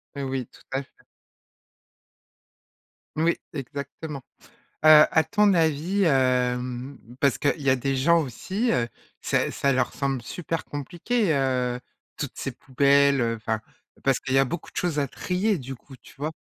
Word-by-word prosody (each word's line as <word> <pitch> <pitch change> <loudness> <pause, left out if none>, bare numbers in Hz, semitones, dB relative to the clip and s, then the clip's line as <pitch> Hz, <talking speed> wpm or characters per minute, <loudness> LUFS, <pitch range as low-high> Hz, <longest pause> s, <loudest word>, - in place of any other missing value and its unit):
Mais 140 - -4
oui, 130 -2 -3
tout - - -20
à 135 +1 -1
fait. - - -26 2.3
Oui, 165 +2 +2 0.2
exactement! 140 +1 -6 0.6
Heu, 155 -1 +9
à 160 - +4
ton 205 +5 +3
avis, 165 +4 +1
hem, 125 -2 +1 0.2
parce 140 -3 +3
qu'il 150 +1 0
y 140 - +2
a 130 - +5
des 135 +2 -1
gens 170 +6 +4
aussi, 190 - -2
heu, 120 -1 +1 0.3
ça - - 0
ça 140 - +1
leur 125 -1 0
semble 135 -2 -1
super 165 +6 -4
compliqué, 175 - -1
heu, 125 -3 0 0.4
toutes - - -4
ces - - -3
poubelles, 140 +1 +3
heu, 115 -1 0
enfin, 110 0 -3 0.4
parce 135 -2 +2
qu'il 130 - -4
y 135 - +5
a 135 - +5
beaucoup 170 - -6
de - - -42
choses 170 -4 0
à 140 - 0
trier, 185 - -1
du 135 -1 -7
coup, 135 +2 -15
tu - - -18
vois? 150 +3 -3
140 Hz, 165 wpm, -25 LUFS, 130-160 Hz, 2.3 s, Heu